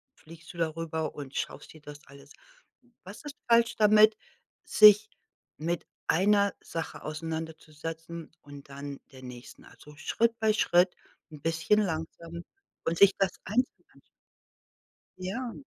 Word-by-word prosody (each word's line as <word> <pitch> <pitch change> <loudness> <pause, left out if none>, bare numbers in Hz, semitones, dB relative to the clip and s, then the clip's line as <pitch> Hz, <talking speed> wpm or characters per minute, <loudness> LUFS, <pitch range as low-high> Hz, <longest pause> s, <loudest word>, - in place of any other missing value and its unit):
fliegst 165 +1 -14
du - - -13
darüber 160 -1 -2
und 140 -2 -8
schaust - - -4
dir 155 - -15
das 145 0 -10
alles 140 +1 -15 0.7
Was 200 +10 -11
ist 295 -1 -8
falsch 230 0 +4
damit, 215 0 +6 0.5
sich 210 0 +7 0.5
mit 170 +2 -2 0.2
einer 200 +3 +3
Sache 165 -1 -6
auseinanderzusetzen 160 +1 -6
und 145 -1 -13
dann 140 0 -7
der 130 -1 -13
nächsten? 125 -1 -11
Also, 150 0 -16
Schritt 230 +9 0
bei 220 -1 +3
Schritt, 180 -3 +3 0.4
'n 150 - -11
bisschen 165 +7 +2
langsam 165 -1 -4 0.4
und 165 - 0
sich 200 +1 +7
das 190 -2 +2
einzeln 245 +6 -1
anzu - - -21 1.2
Ja. 230 +8 -5
165 Hz, 130 wpm, -29 LUFS, 155-205 Hz, 1.2 s, sich